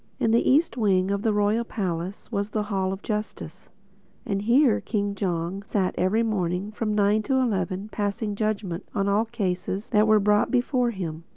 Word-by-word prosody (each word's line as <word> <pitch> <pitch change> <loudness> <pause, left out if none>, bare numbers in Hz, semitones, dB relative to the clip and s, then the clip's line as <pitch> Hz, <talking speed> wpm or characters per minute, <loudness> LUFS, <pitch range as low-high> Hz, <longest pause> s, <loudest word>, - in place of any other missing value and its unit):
In 225 - +2
the 235 - +3
east 295 +1 +3
wing 195 -4 +2
of 200 0 -1
the 220 - +1
Royal 210 +2 +1
Palace 185 -3 -4
was 200 -1 -1
the 215 0 -1
Hall 190 -1 0
of 195 +1 -6
Justice. 210 -5 -5 0.6
And 200 -1 -1
here 240 +3 +3
King 205 -2 -2
Jong 180 -1 -2
sat 195 -2 -1
every 200 +6 +2
morning 195 -2 -1
from 215 0 -2
nine 210 +1 +3
to 265 +5 -1
eleven 195 -5 -1
passing 210 +1 -2
judgment 205 -4 -2
on 200 0 +1
all 205 +3 +2
cases 195 -3 -3
that 210 +1 +4
were 215 0 +5
brought 210 +1 +3
before 250 -1 +1
him. 170 -7 -5
205 Hz, 180 wpm, -25 LUFS, 190-220 Hz, 0.6 s, were